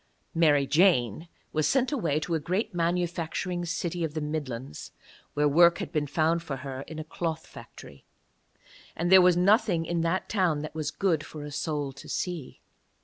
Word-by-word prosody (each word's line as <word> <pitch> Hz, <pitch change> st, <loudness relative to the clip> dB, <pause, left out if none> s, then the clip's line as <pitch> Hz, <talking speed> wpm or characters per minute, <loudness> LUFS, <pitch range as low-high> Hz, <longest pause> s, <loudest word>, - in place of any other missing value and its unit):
Mary 150 Hz, -5 st, +4 dB
Jane 150 Hz, -, +2 dB, 0.3 s
was 155 Hz, -1 st, +1 dB
sent 265 Hz, 0 st, +2 dB
away 165 Hz, -, 0 dB
to 170 Hz, -, -3 dB
a 160 Hz, -, +1 dB
great 185 Hz, +7 st, -2 dB
manufacturing 175 Hz, +1 st, -1 dB
city 170 Hz, 0 st, -3 dB
of 155 Hz, -1 st, -3 dB
the -, -, -1 dB
Midlands, 140 Hz, -, -5 dB, 0.4 s
where 150 Hz, 0 st, +3 dB
work 170 Hz, +4 st, +5 dB
had -, -, -5 dB
been 150 Hz, -4 st, -1 dB
found 160 Hz, +3 st, +1 dB
for 155 Hz, -4 st, -5 dB
her 135 Hz, -1 st, -5 dB
in 160 Hz, -, -8 dB
a 155 Hz, -, -4 dB
cloth 160 Hz, 0 st, -4 dB
factory. 70 Hz, -1 st, -13 dB, 0.9 s
And 175 Hz, +2 st, -1 dB
there 190 Hz, 0 st, +9 dB
was 180 Hz, -1 st, +5 dB
nothing 190 Hz, -2 st, +3 dB
in 170 Hz, 0 st, -1 dB
that 170 Hz, +3 st, -1 dB
town 175 Hz, -8 st, +1 dB
that 155 Hz, -, -6 dB
was 155 Hz, -2 st, -2 dB
good 165 Hz, -5 st, 0 dB
for 155 Hz, -1 st, -9 dB
a 145 Hz, -, -7 dB
soul 145 Hz, -1 st, -2 dB
to 135 Hz, +1 st, -12 dB
see. 175 Hz, -7 st, -4 dB
165 Hz, 180 wpm, -27 LUFS, 150-175 Hz, 0.9 s, there